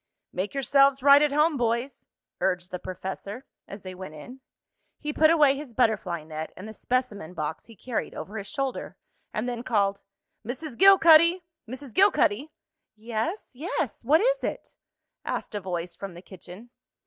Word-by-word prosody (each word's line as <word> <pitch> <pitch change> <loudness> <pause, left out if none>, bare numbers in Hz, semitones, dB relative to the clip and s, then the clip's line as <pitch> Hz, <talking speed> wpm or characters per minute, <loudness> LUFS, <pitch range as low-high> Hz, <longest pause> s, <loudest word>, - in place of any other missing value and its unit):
"Make 190 +8 -3
yourselves 275 0 +3
right 280 0 +8
at 300 -1 +3
home, 300 +1 +2
boys," 235 +2 -2 0.3
urged 180 -1 -1
the 180 - -4
professor, 190 +7 -7 0.2
as 200 +1 -10
they 185 -1 -7
went 185 -4 -9
in. 245 - -11 0.6
He 300 0 -4
put 310 +1 +5
away 300 -4 +5
his 275 -5 -9
butterfly 195 -9 +1
net 155 0 -6
and 190 - -8
the 220 - -8
specimen 215 -9 -2
box 155 0 -4
he 230 - -15
carried 235 +3 -4
over 215 +3 -6
his 200 - -8
shoulder, 275 -4 -4 0.3
and 215 +3 -3
then 240 -1 -3
called: 200 -5 0 0.4
"Mrs. 255 +4 -6
Gilcuddy! 345 -1 +7 0.3
Mrs. 260 0 -8
Gilcuddy!" 315 - +3 0.5
"Yes, 230 - -4
yes! 290 -3 -3
What 300 +8 +4
is - - +1
it?" - - -5 0.5
asked - - -4
a 205 - -3
voice 175 -2 -4
from 195 -3 -8
the 175 - -11
kitchen. 190 +5 -12
240 Hz, 160 wpm, -26 LUFS, 195-285 Hz, 0.6 s, right